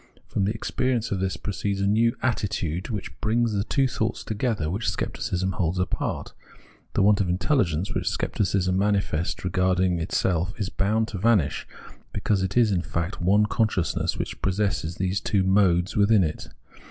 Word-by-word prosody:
From 95 Hz, -, -1 dB
the 100 Hz, -, +1 dB
experience 120 Hz, +1 st, -1 dB
of 100 Hz, -, 0 dB
this 95 Hz, -1 st, -1 dB
proceeds 100 Hz, +1 st, -3 dB
a 100 Hz, -, +1 dB
new 115 Hz, +3 st, +3 dB
attitude 95 Hz, -8 st, -1 dB
which 105 Hz, -4 st, -5 dB
brings 115 Hz, +1 st, +1 dB
the 100 Hz, -1 st, 0 dB
two 135 Hz, +4 st, +1 dB
thoughts 115 Hz, -2 st, -2 dB
together 110 Hz, -6 st, -1 dB
which 100 Hz, +8 st, -1 dB
Scepticism 95 Hz, +1 st, -2 dB
holds 85 Hz, 0 st, -1 dB
apart. 90 Hz, -, -2 dB, 0.6 s
The -, -, +3 dB
want 100 Hz, 0 st, +4 dB
of 95 Hz, -, 0 dB
intelhgence 90 Hz, -, +1 dB
which -, -, 0 dB
Scepticism 95 Hz, -2 st, 0 dB
manifests 100 Hz, -4 st, 0 dB
regarding 90 Hz, -1 st, +1 dB
itself 90 Hz, +1 st, 0 dB
is 100 Hz, -2 st, -1 dB
bound 110 Hz, +3 st, 0 dB
to 100 Hz, -, -5 dB
vanish, 105 Hz, -7 st, +2 dB, 0.5 s
because 100 Hz, -3 st, 0 dB
it 95 Hz, +4 st, -1 dB
is 115 Hz, -3 st, +5 dB
in 90 Hz, -3 st, +1 dB
fact 85 Hz, +2 st, -3 dB
one 100 Hz, +4 st, +4 dB
consciousness 105 Hz, -6 st, 0 dB
which -, -, -5 dB
possesses 95 Hz, -4 st, -1 dB
these 95 Hz, +2 st, -1 dB
two 100 Hz, -3 st, +1 dB
modes 95 Hz, -2 st, +3 dB
wjthin 105 Hz, -1 st, +4 dB
it. 75 Hz, -, -3 dB
95 Hz, 165 wpm, -25 LUFS, 90-105 Hz, 0.6 s, is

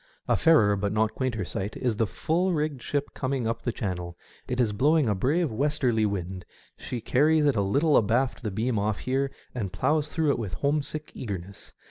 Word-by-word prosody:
A -, -, +3 dB
fairer, 110 Hz, -12 st, +5 dB
but 100 Hz, 0 st, -1 dB
not 110 Hz, +1 st, +1 dB
a -, -, -29 dB
quainter, 120 Hz, -7 st, -2 dB
sight 95 Hz, +4 st, -4 dB
is 120 Hz, -5 st, -1 dB
the 115 Hz, -, +2 dB
full 175 Hz, -, 0 dB
rigged 150 Hz, -4 st, -1 dB
ship 145 Hz, +2 st, -2 dB
coming 130 Hz, -2 st, -2 dB
up 115 Hz, +2 st, -1 dB
Channel. 90 Hz, -5 st, -4 dB, 0.3 s
It 125 Hz, 0 st, -2 dB
is 115 Hz, -4 st, +2 dB
blowing 145 Hz, +6 st, +3 dB
a 105 Hz, -, +2 dB
brave 145 Hz, -, +1 dB
westerly 125 Hz, -3 st, +1 dB
wind; 95 Hz, -2 st, -4 dB, 0.3 s
she 120 Hz, -, -5 dB
carries 150 Hz, +6 st, +3 dB
it 140 Hz, -3 st, +3 dB
a 100 Hz, -, +2 dB
little 140 Hz, +10 st, +2 dB
abaft 120 Hz, +5 st, +2 dB
the 110 Hz, -, -2 dB
beam 110 Hz, +3 st, -1 dB
off 105 Hz, 0 st, -1 dB
here, 135 Hz, +2 st, 0 dB, 0.2 s
and 105 Hz, -7 st, -3 dB
ploughs 150 Hz, +6 st, +1 dB
through 155 Hz, -2 st, +1 dB
it -, -, -1 dB
with 105 Hz, -5 st, -4 dB
home 145 Hz, +1 st, +1 dB
sick 155 Hz, +2 st, -7 dB
eagerness. 100 Hz, -4 st, -7 dB
125 Hz, 200 wpm, -27 LUFS, 105-145 Hz, 0.3 s, fairer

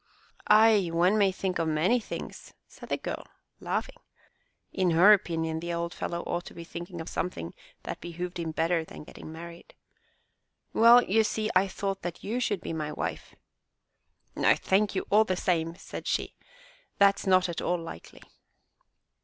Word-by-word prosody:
Ay! 215 Hz, -4 st, +5 dB
one 175 Hz, +5 st, +3 dB
may 200 Hz, -3 st, +4 dB
think 185 Hz, -1 st, -3 dB
of 165 Hz, -, 0 dB
many 160 Hz, +10 st, +2 dB
things," 225 Hz, -, -8 dB
said -, -, -13 dB
the -, -, 0 dB
girl, -, -, -5 dB, 0.4 s
laughing. -, -, -3 dB, 0.7 s
In 185 Hz, -2 st, +1 dB
her 200 Hz, +5 st, +9 dB
opinion 160 Hz, -4 st, -1 dB
the 170 Hz, +1 st, -4 dB
old 170 Hz, 0 st, -3 dB
fellow 170 Hz, 0 st, -4 dB
ought 175 Hz, 0 st, -3 dB
to -, -, -11 dB
be 170 Hz, -, -7 dB
thinking 170 Hz, +1 st, -8 dB
of 160 Hz, -, -6 dB
something 85 Hz, -, -4 dB, 0.3 s
that -, -, -6 dB
behooved 175 Hz, +1 st, -6 dB
him 165 Hz, -1 st, -3 dB
better 165 Hz, +1 st, 0 dB
than 160 Hz, -, -11 dB
getting 155 Hz, -, -11 dB
married. 170 Hz, +1 st, -11 dB, 1.0 s
"Well, 235 Hz, +2 st, +7 dB
you 220 Hz, +4 st, +3 dB
see, 215 Hz, 0 st, -1 dB
I 190 Hz, +1 st, +4 dB
thought 195 Hz, 0 st, -3 dB
that 175 Hz, -1 st, -6 dB
you 230 Hz, +5 st, -2 dB
should 205 Hz, -7 st, -1 dB
be -, -, -5 dB
my 155 Hz, -2 st, -3 dB
wife!" 85 Hz, -, -5 dB, 1.0 s
No, -, -, +4 dB
thank 200 Hz, +1 st, +1 dB
you 190 Hz, -, -1 dB
all 215 Hz, +2 st, +6 dB
the 185 Hz, -4 st, -2 dB
same," 165 Hz, -3 st, 0 dB
said -, -, -8 dB
she, -, -, -1 dB, 0.6 s
"that's 200 Hz, 0 st, +3 dB
not 185 Hz, -1 st, +4 dB
at 170 Hz, -, -4 dB
all 175 Hz, -, 0 dB
likely." 165 Hz, -, -10 dB
180 Hz, 170 wpm, -28 LUFS, 165-200 Hz, 1.0 s, her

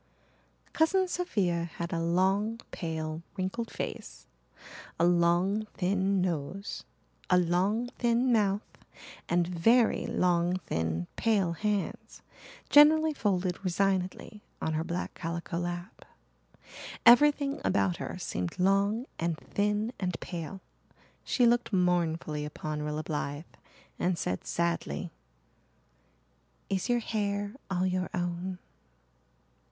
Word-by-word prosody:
Cousin 370 Hz, +4 st, +3 dB
Sophia 195 Hz, -, 0 dB
had 170 Hz, +1 st, -4 dB
a 165 Hz, -, 0 dB
long, 190 Hz, +6 st, +1 dB
pale, 160 Hz, -1 st, -4 dB, 0.2 s
wrinkled 195 Hz, +5 st, -2 dB
face, -, -, -6 dB, 0.7 s
a 170 Hz, -, +4 dB
long, 175 Hz, +5 st, +2 dB
thin 190 Hz, +1 st, +1 dB
nose, 180 Hz, +3 st, -3 dB, 0.4 s
a 180 Hz, -, +5 dB
long, 180 Hz, +6 st, +2 dB
thin 240 Hz, +1 st, +3 dB
mouth, 205 Hz, -2 st, +2 dB, 0.7 s
and 175 Hz, 0 st, +3 dB
very 225 Hz, +7 st, +3 dB
long, 175 Hz, 0 st, +2 dB
thin, 80 Hz, +1 st, -1 dB
pale 205 Hz, -6 st, +2 dB
hands, 205 Hz, +3 st, -3 dB, 0.4 s
generally 310 Hz, +2 st, +6 dB
folded 190 Hz, -7 st, -1 dB
resignedly 190 Hz, +2 st, -1 dB, 0.2 s
on 160 Hz, -, -1 dB
her 155 Hz, +1 st, 0 dB
black 175 Hz, +1 st, -4 dB
calico 170 Hz, 0 st, -4 dB
lap. 175 Hz, 0 st, -5 dB, 1.0 s
Everything 285 Hz, +3 st, +6 dB
about 95 Hz, -3 st, +1 dB
her -, -, -5 dB
seemed 90 Hz, 0 st, -4 dB
long 200 Hz, +5 st, +2 dB
and 165 Hz, -1 st, -1 dB
thin 210 Hz, +6 st, -1 dB
and 180 Hz, -2 st, -2 dB
pale. 175 Hz, +2 st, -6 dB, 0.6 s
She 245 Hz, -, +2 dB
looked 240 Hz, 0 st, +3 dB
mournfully 170 Hz, -5 st, +1 dB
upon 150 Hz, 0 st, -4 dB
Rilla 150 Hz, +1 st, -3 dB
Blythe 145 Hz, 0 st, -3 dB, 0.5 s
and 180 Hz, -1 st, +1 dB
said 90 Hz, -, -3 dB
sadly, 170 Hz, 0 st, -1 dB, 1.6 s
"Is 195 Hz, +4 st, -1 dB
your 240 Hz, -, +4 dB
hair 205 Hz, -2 st, -2 dB, 0.2 s
all 185 Hz, -1 st, 0 dB
your 185 Hz, 0 st, -1 dB
own?" 175 Hz, +1 st, -3 dB
185 Hz, 110 wpm, -29 LUFS, 170-210 Hz, 1.6 s, generally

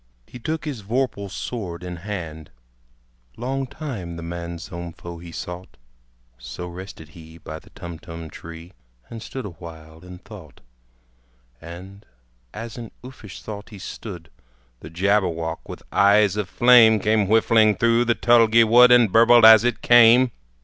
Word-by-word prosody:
He 125 Hz, -, -12 dB
took 160 Hz, +6 st, -4 dB
his 140 Hz, -7 st, -5 dB
vorpal 110 Hz, -2 st, -3 dB
sword 95 Hz, -5 st, -6 dB
in 90 Hz, -1 st, -7 dB
hand: 85 Hz, -5 st, -7 dB, 0.9 s
Long 135 Hz, +2 st, -3 dB
time 110 Hz, -, -7 dB
the 85 Hz, -, -8 dB
manxome 85 Hz, 0 st, -7 dB
foe 85 Hz, 0 st, -10 dB
he 85 Hz, 0 st, -11 dB
sought. 90 Hz, +2 st, -9 dB, 0.6 s
So 65 Hz, +8 st, -8 dB
rested 90 Hz, -3 st, -11 dB
he 80 Hz, 0 st, -15 dB
by 80 Hz, -1 st, -9 dB
the -, -, -21 dB
Tumtum 85 Hz, -1 st, -10 dB
tree, 85 Hz, +2 st, -12 dB, 0.4 s
And 115 Hz, -1 st, -8 dB
stood 130 Hz, +1 st, -7 dB
awhile 80 Hz, -3 st, -12 dB
in 90 Hz, +1 st, -12 dB
thought. 95 Hz, -5 st, -14 dB, 1.0 s
And 90 Hz, +5 st, -11 dB, 0.5 s
as 115 Hz, +2 st, -8 dB
in 115 Hz, -2 st, -8 dB
uffish 125 Hz, -6 st, -12 dB
thought 105 Hz, -1 st, -9 dB
he 105 Hz, -, -12 dB
stood, 90 Hz, -4 st, -9 dB, 0.5 s
The 75 Hz, -, -11 dB
Jabberwock 85 Hz, -3 st, -1 dB
with -, -, -9 dB
eyes 100 Hz, 0 st, +3 dB
of 105 Hz, -3 st, -4 dB
flame, 120 Hz, -2 st, +5 dB
Came 105 Hz, 0 st, +1 dB
whiffling 110 Hz, 0 st, +3 dB
through 115 Hz, +1 st, +2 dB
the 120 Hz, 0 st, +1 dB
tulgey 115 Hz, -1 st, +4 dB
wood, 120 Hz, +2 st, +6 dB
And 120 Hz, -4 st, +5 dB
burbled 115 Hz, +1 st, +6 dB
as 110 Hz, -1 st, +8 dB
it 120 Hz, -1 st, -2 dB
came! 120 Hz, +1 st, +6 dB
100 Hz, 145 wpm, -22 LUFS, 85-115 Hz, 1.0 s, as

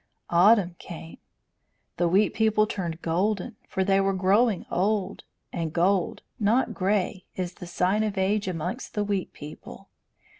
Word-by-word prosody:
Autumn 180 Hz, 0 st, +5 dB
came. 165 Hz, -1 st, -9 dB, 0.8 s
The 175 Hz, -, +2 dB
Wheat 195 Hz, +5 st, +3 dB
People 220 Hz, -1 st, +3 dB
turned 175 Hz, -6 st, -4 dB
golden, 195 Hz, +6 st, 0 dB
for 190 Hz, -, -1 dB
they 195 Hz, 0 st, +3 dB
were 195 Hz, 0 st, +1 dB
growing 200 Hz, +3 st, +2 dB
old; 200 Hz, 0 st, 0 dB, 0.3 s
and 165 Hz, -2 st, -2 dB
gold, 180 Hz, +2 st, +1 dB, 0.2 s
not 225 Hz, +5 st, +2 dB
grey, 190 Hz, 0 st, 0 dB
is 180 Hz, -1 st, -3 dB
the 180 Hz, -2 st, -10 dB
sign 185 Hz, +4 st, +1 dB
of 210 Hz, -2 st, -2 dB
age 200 Hz, +2 st, +1 dB
amongst 180 Hz, +7 st, -4 dB
the 210 Hz, -, +1 dB
Wheat 200 Hz, -2 st, -2 dB
People. 150 Hz, +1 st, -11 dB
190 Hz, 145 wpm, -26 LUFS, 175-210 Hz, 0.8 s, Autumn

